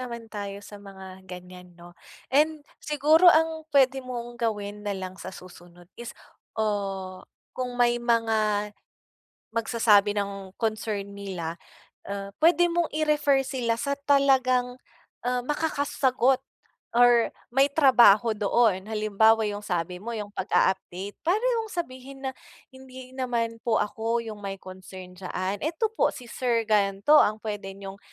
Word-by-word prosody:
naman 235 -2 -6
tayo 200 -1 -5
sa 205 - -11
mga 190 -1 -11
ganyan, 180 -1 -11
'no. 175 0 -14 0.4
And 300 +1 +2 0.2
siguro 305 +4 +4
ang 320 -1 +3
pwede 265 -1 +4
mong 240 -2 -7
gawin 210 -2 -2
na 200 -1 -2
lang 185 0 -6
sa - - -7
susunod 175 -1 -13
is, 240 -1 -8 0.4
oh, 195 -3 -2 0.3
kung 250 -1 -4
may 240 0 +2
mga 220 -3 +1 0.8
magsasabi 220 -3 +3
ng 195 -2 -4
concern 215 -2 -2
nila, 180 -5 -5 0.5
ah, 200 0 -5
pwede 350 +2 +5
mong 340 -1 0
i-refer 295 -3 +2
sila 240 -4 -1
sa 280 +2 -1
talagang, 255 -3 +3 0.5
ah, 250 0 0
makakasagot 270 -3 +1 0.6
or 240 -1 +5 0.2
may 270 +2 +5
trabaho 240 -6 +6
doon. 205 -2 +2
Halimbawa, 220 +1 +3
yung 205 0 -6
sabi 180 0 -2
mo 235 - -5
yung 210 -1 -6
pag-a-update, 190 +1 -1
parang 390 +6 +2 0.2
yung - - -7
sabihin 270 -4 -6
na - - 0 0.4
"Hindi 260 -1 -12
naman 235 -3 -2
po 230 -2 +1
ako 225 +3 -2
yung 220 -2 -7
may 195 -1 -4
concern 185 0 -11
diyaan. 185 +1 -3
Eto 335 +8 -1
po - - +2
si 245 - -10
sir 235 -2 0
gan'to 205 +7 +4
ang 215 +1 +2
pwede 205 -3 -5
niyong 195 0 -9
225 Hz, 135 wpm, -26 LUFS, 200-260 Hz, 0.8 s, trabaho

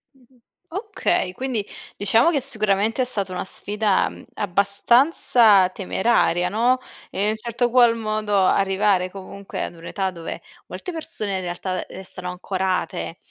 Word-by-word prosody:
Mh-mh, 255 -1 -26 0.3
okay. 385 - -1
Quindi, 240 -2 -3 0.3
diciamo 225 - +3
che, 285 - +1
sicuramente 220 -2 +1
è - - +2
stata 200 -6 0
una 180 - -3
sfida, 205 0 +1
mhmm, - - -13
abbastanza 205 - +4
temeraria, 185 -2 +1
no, 240 +4 +2 0.3
e 195 - -2
in 210 - +2
un - - -2
certo 235 +2 -1
qual 240 -1 +5
modo 215 -2 -1
arrivare, 190 0 +2
comunque, 195 +1 -7
ad - - -6
un'età 190 +3 -3
dove 170 -2 -7 0.3
molte 365 - -6
persone, 215 - -3
in - - -3
realtà, 180 +1 -3
restano 185 -1 -8
ancorate, 180 - -2
205 Hz, 140 wpm, -22 LUFS, 185-235 Hz, 0.3 s, qual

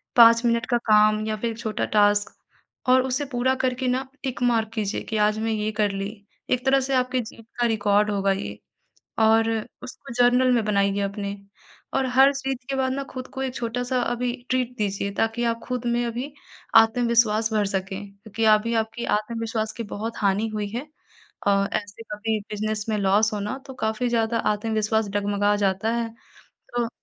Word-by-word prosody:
5 230 0 +8
minute 235 -1 +2
का 240 - +3
काम 215 0 +4
या 215 - -1
फिर 230 +2 -2
एक 225 - -9
छोटा 220 -2 -2
टास्क 205 0 +3 0.5
और 255 0 +6
उसे 265 +3 -1
पूरा 250 +1 +1
करके 255 0 0
ना 255 +2 0 0.2
टिक 260 -3 -4
मार्क 230 -3 +2
कीजिए 215 -2 -2
कि 220 - -1
आज 210 0 +2
मैं 225 0 -1
ये 215 0 -1
कर 205 -1 +3
ली 195 0 -3 0.4
एक 250 0 +1
तरह 270 0 +4
से 270 +1 -2
आपकी 255 0 +1
जीत 225 0 -11
का 240 - +3
रिकॉर्ड 210 -1 +2
होगा 195 -1 +1
ये 195 +1 -4 0.6
और 225 0 +4 0.3
उसको 250 - -9
जर्नल 250 +1 +5
में 235 -2 +2
बनाइए 200 -1 +1
अपने 200 0 -3 0.6
और 270 0 +1
हर 270 +1 +7
चीज़ 270 -1 -3
के 270 - -1
बाद 260 -1 0
ना 275 +1 -3
खुद 255 -1 -6
को 265 - -3
एक 260 -1 -3
छोटा-सा 245 +2 -1
अभी 245 0 -1 0.2
ट्रीट 255 -1 0
दीजिए 200 -1 -2
ताकि 225 +2 0
आप 230 0 -2
खुद 250 -1 -3
में 240 0 +1
अभी 245 +5 -4 0.4
आत्मविश्वास 225 -1 +4
भर 210 -1 +2
सकें 190 0 -3
क्योंकि 215 +2 -4
अभी 225 +2 -1
आपकी 225 +2 -7
आत्मविश्वास 220 0 -3
की 230 - -3
बहुत 225 +3 -4
हानि 205 +1 +1
हुई 210 -1 -2
है 245 +8 -5 0.6
अ, 200 0 +3
ऐसे 205 +2 -4
कभी 215 +1 -1
बिजनेस 210 0 -2
में 215 - +1
लॉस 205 +3 +3
हो 210 - -2
ना 210 +6 -3
तो 265 - -8
काफ़ी 220 +3 0
ज़्यादा 230 -1 +1 0.2
आत्मविश्वास 220 0 0
डगमगा 205 0 +1
जाता 195 +3 0
है 235 -1 -1 0.7
तो 240 -1 +1
225 Hz, 185 wpm, -24 LUFS, 210-245 Hz, 0.7 s, 5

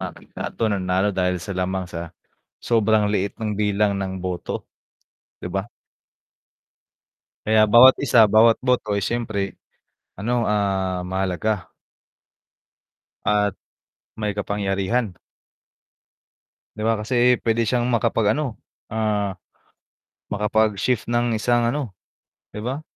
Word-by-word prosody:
ah, - - -4
ito 115 - -5
nanalo 95 0 +1
dahil 90 -1 0
sa 100 +3 -6
lamang 95 0 -2
sa 85 -1 -7 0.5
sobrang 110 -2 +2
liit 100 -1 -1
ng 105 -2 -2
bilang 105 -1 +1
ng 95 -1 -4
boto, 90 -2 -4 0.7
'di - - -5
ba? - - -2 1.8
Kaya 110 0 +4
bawat 120 +5 +7
isa, 120 -5 +5
bawat 110 +2 +5
boto, 120 -5 +1
ay 100 - -1
syempre, 110 -5 -3 0.5
ano, 120 +4 -1
ah, 95 -3 0
mahalaga. 95 +2 -2 1.6
At 105 -2 +1 0.6
may 105 -2 -2
kapangyarihan. 100 +1 -1 1.6
'Diba, 110 +1 0
kasi 120 +3 +2
pwede 115 +1 +2
siyang 120 +2 0
makapag-ano, 115 +1 0 0.3
ah, 105 -3 -1 1.0
makapag-shift 110 +2 +1
ng 120 0 +1
isang, 120 +2 +2
ano, 135 -7 -4 0.6
'di 105 +1 -7
ba? 135 +4 -3
105 Hz, 105 wpm, -22 LUFS, 95-115 Hz, 1.8 s, bawat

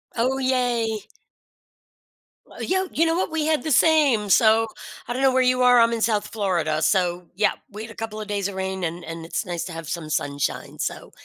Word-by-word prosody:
Oh, 255 +3 +1
yay. 240 -5 0 1.4
W - - -14 0.2
y 375 0 -1
you 330 - +3
know 325 0 +1
what? 355 - -1
We 315 -2 -1
had 310 -1 +1
the 310 - -2
same. 270 -8 +4
So 225 +1 +5 0.4
I 240 - -2
don't 260 - -3
know 265 -1 +4
where 260 - +3
you 255 0 +2
are, 245 -1 +6
I'm 230 0 +4
in 230 - -2
South 215 -2 +1
Florida. 170 -8 -1
So, 180 -2 +1
yeah, 210 +2 +3 0.2
we 210 +2 -8
had 225 - -9
a - - -13
couple 215 -1 -5
of 210 - -7
days 205 -1 -1
of 200 - -7
rain, 190 -1 -3
and 170 +1 -3
and 165 0 -7
it's 165 - -3
nice 175 -2 -3
to 175 - -7
have 165 -1 -7
some 165 -3 -4
sunshine. 145 -2 -2
So - - -4
220 Hz, 220 wpm, -23 LUFS, 180-255 Hz, 1.4 s, are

